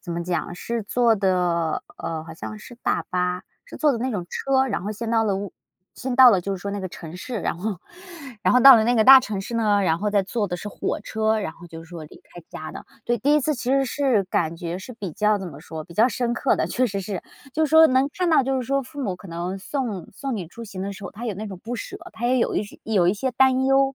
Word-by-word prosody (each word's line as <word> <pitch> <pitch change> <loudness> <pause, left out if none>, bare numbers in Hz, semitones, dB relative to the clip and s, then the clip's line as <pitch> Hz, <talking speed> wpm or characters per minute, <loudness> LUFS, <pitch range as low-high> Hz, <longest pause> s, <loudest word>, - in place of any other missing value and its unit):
怎 175 - -9
么 170 - -2
讲 175 -1 -2
是 230 +5 -3
坐 235 +2 +2
的 180 -5 0 0.2
呃， 160 -1 -4
好 165 - -9
像 215 +6 -7
是 240 +3 -12
大 - - 0
巴， 180 0 -1 0.2
是 - - -10
坐 300 -2 +3
的 235 - -2
那 255 +3 -1
种 185 -6 -3
车， 265 -1 +1
然 205 -8 -2
后 205 - -3
先 225 +2 -5
到 225 -1 +3
了 200 -2 +1
我 200 -1 -5 0.4
先 260 -1 -4
到 260 -2 +9
了 195 -5 +3
就 195 +3 -3
是 - - -10
说 200 - -4
那 205 - -4
个 185 - -4
城 165 -1 -10
市， 235 +3 -5
然 - - -2
后 195 0 -3 0.6
然 - - +3
后 250 - +5
到 270 -1 +10
了 220 - +3
那 245 - +2
个 220 - +4
大 265 +2 +11
城 215 -6 -4
市 220 +4 -6
呢， 210 -3 +2
然 165 -3 +1
后 210 +2 -1
再 205 -1 +3
坐 205 +2 -2
的 175 -2 -3
是 210 - -7
火 205 - -3
车， 220 +1 0
然 160 - -4
后 175 - -14
就 165 -1 -10
是 165 - -16
说 170 -3 -8
离 150 - -14
开 175 - -14
家 155 - -7
的。 - - -9 0.2
对， 240 - +2
第 285 +7 +3
一 300 - +4
次 305 +2 0
其 250 0 -3
实 275 0 +3
是 260 -6 +1
感 170 -3 -1
觉 170 0 -4
是 220 +7 -9
比 205 -6 -6
较 210 +4 +2
怎 190 - -6
么 140 -4 -11
说， 160 +1 -7
比 170 - -14
较 225 +6 +5
深 240 -1 -1
刻 265 - +2
的。 - - 0
确 255 +1 +1
实 200 -3 -3
是 190 -1 -5 0.3
就 315 - +2
是 305 - -2
说 320 0 +8
能 260 0 +2
看 360 -1 -1
到 315 -4 +5
就 265 0 0
是 - - -3
说 275 +1 +1
父 280 +3 -9
母 190 -6 -2
可 195 - -13
能 175 +2 -4
送 215 - -4
送 270 +3 -4
你 185 -5 -5
出 230 +8 -10
行 195 -4 -7
的 200 +1 -3
时 200 - -11
候， - - -6
他 225 +4 -8
有 215 - -2
那 215 +3 -6
种 190 -3 -8
不 235 +3 -4
舍， 230 - -6 0.2
他 235 +2 -3
也 255 +1 +3
有 - - 0
一 - - +1
些 205 - -12
有 195 -6 +2
一 185 - +3
些 260 +5 -2
担 260 +1 +3
忧， 270 0 +3
210 Hz, 310 characters per minute, -23 LUFS, 180-250 Hz, 0.6 s, 大